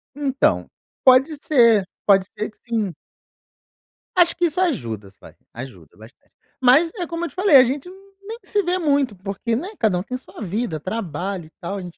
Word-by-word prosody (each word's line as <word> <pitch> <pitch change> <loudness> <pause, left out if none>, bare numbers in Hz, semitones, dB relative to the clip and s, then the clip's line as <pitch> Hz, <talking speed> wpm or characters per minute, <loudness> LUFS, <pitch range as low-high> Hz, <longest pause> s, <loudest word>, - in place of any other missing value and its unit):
Então, 280 -1 +1 0.4
pode 265 +4 +5
ser. 230 -9 +4 0.2
Pode 195 -2 +5
ser 215 - -3
que 215 - -24
sim. 215 -6 -1 1.2
Acho 350 -2 +4
que 350 - +1
isso 340 +2 -1
ajudas, 110 - -3
vai, - - -15 0.2
ajuda 105 - -10
bastante. 110 +5 -18 0.3
Mas, 275 +7 +5
é 350 -4 -4
como 335 0 -3
eu - - -5
te - - -22
falei, 375 -5 +4
a 260 - +10
gente 270 +6 -3
n 385 +2 -14
nem 445 +3 -8
se 415 - 0
vê 365 -1 0
muito 280 - +1
porque, 195 +4 -3
né, 325 - -4
cada 210 -5 +2
um 180 - -3
tem 255 - -5
sua 260 - -14
vida, 195 -4 -3
trabalho 185 -1 -4
e - - -16
tal. 195 +2 -4
A - - -5
gente 175 -1 -10
235 Hz, 195 wpm, -21 LUFS, -, 1.2 s, a